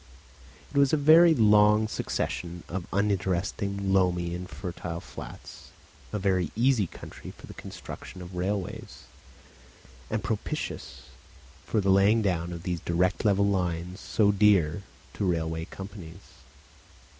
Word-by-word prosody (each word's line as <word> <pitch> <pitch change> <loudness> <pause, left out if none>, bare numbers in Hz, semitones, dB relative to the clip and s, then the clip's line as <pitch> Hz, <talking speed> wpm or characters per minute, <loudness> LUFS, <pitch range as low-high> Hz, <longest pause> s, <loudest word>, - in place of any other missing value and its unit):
It 140 - +2
was 140 0 +4
a - - +5
very 160 +3 +7
long 105 -2 +5
succession 85 -4 -3
of 90 0 -5
uninteresting 100 0 -1
loamy 90 -2 +2
and 90 +1 -6
fertile 85 -2 -5
flats, - - -10 0.4
a 105 - -2
very 95 -4 +1
easy 120 -3 +3
country - - -10
for - - -12
the - - -10
construction 95 - -9
of 90 +1 -10
railways, 95 +1 -4 1.1
and 110 -2 -2
propitious 105 +1 -4 0.6
for 110 - +1
the 95 0 +2
laying 100 +4 +4
down 90 -3 0
of 85 -1 -7
these 90 -1 -2
direct 90 +1 0
level 100 -1 +4
lines 90 -1 -1
so 105 -2 +2
dear 100 -4 +3 0.3
to 95 -3 0
railway 80 -1 -2
companies. 95 -4 -10
95 Hz, 130 wpm, -27 LUFS, 90-105 Hz, 1.1 s, very